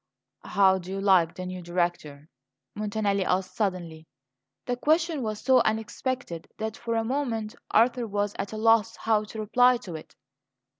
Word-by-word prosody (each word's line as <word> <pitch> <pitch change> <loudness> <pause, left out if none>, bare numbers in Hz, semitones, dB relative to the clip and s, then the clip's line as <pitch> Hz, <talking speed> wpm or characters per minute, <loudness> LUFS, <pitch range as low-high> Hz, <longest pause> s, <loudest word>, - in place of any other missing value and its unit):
"How 190 -1 +4
do 180 0 -10
you 195 +1 -3
like 185 -4 +3
the 185 - -6
new 185 0 -6
Director?" 175 -4 -3 0.5
Montanelli 205 -2 -1
asked 185 0 -1
suddenly. 175 -6 -3 0.6
The 245 - -1
question 315 +3 +1
was 215 -3 -3
so 260 0 +5
unexpected 220 -3 -3
that, 220 0 -4
for 230 -1 -3
a 225 - +1
moment, 230 -4 -2 0.2
Arthur 235 +1 +3
was 205 0 -1
at 200 - -3
a 215 - -5
loss 225 0 +3
how 215 -1 +1
to 220 +1 -8
reply 245 +4 +4
to 185 -7 -9
it. 155 - -11
215 Hz, 160 wpm, -27 LUFS, 185-230 Hz, 0.6 s, so